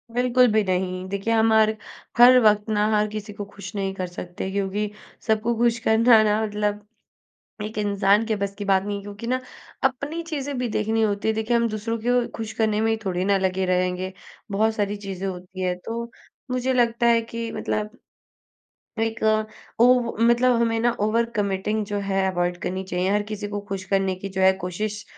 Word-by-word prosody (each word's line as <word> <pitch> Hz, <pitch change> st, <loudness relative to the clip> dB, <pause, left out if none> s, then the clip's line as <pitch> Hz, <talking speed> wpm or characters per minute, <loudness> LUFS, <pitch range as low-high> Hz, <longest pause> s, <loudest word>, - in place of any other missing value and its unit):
बिल्कुल 250 Hz, 0 st, +4 dB
भी 215 Hz, 0 st, +3 dB
नहीं, 185 Hz, -1 st, -2 dB
देखिए 200 Hz, +3 st, -1 dB
हम 225 Hz, 0 st, +3 dB
हर 220 Hz, 0 st, +4 dB, 0.4 s
हर 250 Hz, +1 st, +9 dB
वक्त 210 Hz, 0 st, +3 dB
ना 210 Hz, -1 st, +2 dB
हर 210 Hz, 0 st, +2 dB
किसी 210 Hz, 0 st, -6 dB
को 205 Hz, 0 st, -6 dB
खुश 200 Hz, 0 st, -10 dB
नहीं 195 Hz, -1 st, -2 dB
कर 185 Hz, -1 st, -4 dB
सकते 180 Hz, +1 st, -6 dB
क्योंकि 200 Hz, +1 st, -1 dB, 0.4 s
सबको 220 Hz, +1 st, +1 dB
खुश 235 Hz, 0 st, +2 dB
करना 225 Hz, 0 st, +6 dB
ना 210 Hz, 0 st, +2 dB
मतलब, 210 Hz, 0 st, -2 dB, 0.8 s
एक 215 Hz, 0 st, -6 dB
इंसान 205 Hz, +1 st, +2 dB
के 220 Hz, -1 st, 0 dB
बस 200 Hz, -1 st, -3 dB
की 205 Hz, -, -6 dB
बात 195 Hz, -1 st, +3 dB
नहीं 205 Hz, 0 st, -3 dB
है -, -, -7 dB
क्योंकि 205 Hz, +3 st, -8 dB
ना 255 Hz, +1 st, +1 dB, 0.4 s
अपनी 280 Hz, +5 st, -1 dB
चीज़ें 285 Hz, -4 st, -4 dB
भी 245 Hz, -1 st, -1 dB
देखनी 220 Hz, +1 st, 0 dB
होती 205 Hz, -1 st, 0 dB
है। 220 Hz, -, +3 dB
देखिए 220 Hz, +2 st, 0 dB
हम 235 Hz, 0 st, +2 dB
दूसरों 225 Hz, +2 st, -3 dB
को 245 Hz, 0 st, +2 dB
खुश 220 Hz, -1 st, -5 dB
करने 215 Hz, -1 st, +1 dB
में 225 Hz, 0 st, +2 dB
थोड़ी 185 Hz, -1 st, -1 dB
ना 200 Hz, 0 st, +3 dB
लगे 190 Hz, 0 st, 0 dB
रहेंगे, 185 Hz, 0 st, -1 dB, 0.4 s
बहुत 220 Hz, +2 st, +2 dB
सारी 205 Hz, -1 st, -1 dB
चीज़ें 195 Hz, -1 st, -5 dB
होती 185 Hz, 0 st, -7 dB
है, 180 Hz, -1 st, 0 dB
तो 230 Hz, +5 st, -6 dB, 0.4 s
मुझे 255 Hz, +1 st, 0 dB
लगता 235 Hz, -1 st, +2 dB
है 230 Hz, -1 st, +4 dB
कि 230 Hz, 0 st, -5 dB
मतलब 215 Hz, +3 st, -3 dB, 1.0 s
एक 225 Hz, 0 st, -1 dB, 0.6 s
ओव 245 Hz, -1 st, +4 dB
मतलब 240 Hz, +2 st, +4 dB
हमें 230 Hz, -1 st, +1 dB
ना 240 Hz, +1 st, +3 dB
ओवर 220 Hz, +3 st, +2 dB
कमिटिंग 205 Hz, +1 st, -1 dB
जो 205 Hz, 0 st, -2 dB
है 195 Hz, -1 st, 0 dB
अवॉइड 175 Hz, -1 st, -1 dB
करनी 190 Hz, +1 st, -3 dB
चाहिए, 180 Hz, 0 st, -1 dB
हर 205 Hz, 0 st, +2 dB
किसी 210 Hz, -1 st, -5 dB
को 205 Hz, 0 st, -4 dB
खुश 195 Hz, -1 st, -4 dB
करने 195 Hz, 0 st, +1 dB
की 195 Hz, +2 st, -6 dB
जो 190 Hz, 0 st, -4 dB
है 190 Hz, 0 st, +6 dB
कोशिश 205 Hz, +4 st, -4 dB
210 Hz, 195 wpm, -24 LUFS, 195-230 Hz, 1.0 s, हर